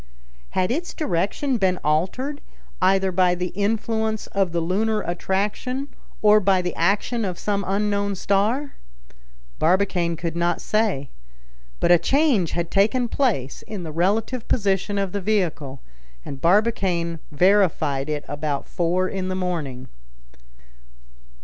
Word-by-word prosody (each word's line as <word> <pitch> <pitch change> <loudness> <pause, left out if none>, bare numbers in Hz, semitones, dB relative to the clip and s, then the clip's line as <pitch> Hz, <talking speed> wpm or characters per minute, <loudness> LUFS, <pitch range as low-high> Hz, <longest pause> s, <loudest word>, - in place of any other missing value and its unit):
Had 185 +2 +2
its 335 +7 -3
direction 245 - -1
been 185 -2 +2
altered, 195 - -1 0.4
either 190 0 +3
by 180 0 +3
the 180 0 -3
influence 220 +2 -1
of 195 -3 0
the 170 - 0
lunar 210 +6 0
attraction, 205 +10 -2 0.3
or 210 0 +7
by 195 -2 +3
the 180 -1 -2
action 205 +6 +1
of 185 -3 -3
some 200 -1 -1
unknown 200 0 0
star? 215 +10 0 0.9
Barbicane 175 0 +2
could 170 0 -4
not 170 0 0
say. 210 -11 0 0.7
But - - +3
a 175 - +7
change 260 - +2
had 170 -1 -2
taken 225 +5 +2
place 200 - -1
in 205 -4 -7
the 160 - -6
relative 210 +9 0
position 200 -2 0
of 195 -2 -1
the 200 - -3
vehicle; 165 - -1 0.4
and 135 -1 -7
Barbicane 175 -3 +1
verified 155 -5 +2
it 150 -1 -3
about 145 0 -3
four 180 +2 0
in 190 -1 -3
the 185 - -2
morning. 155 -9 -3
190 Hz, 130 wpm, -23 LUFS, 170-210 Hz, 0.9 s, or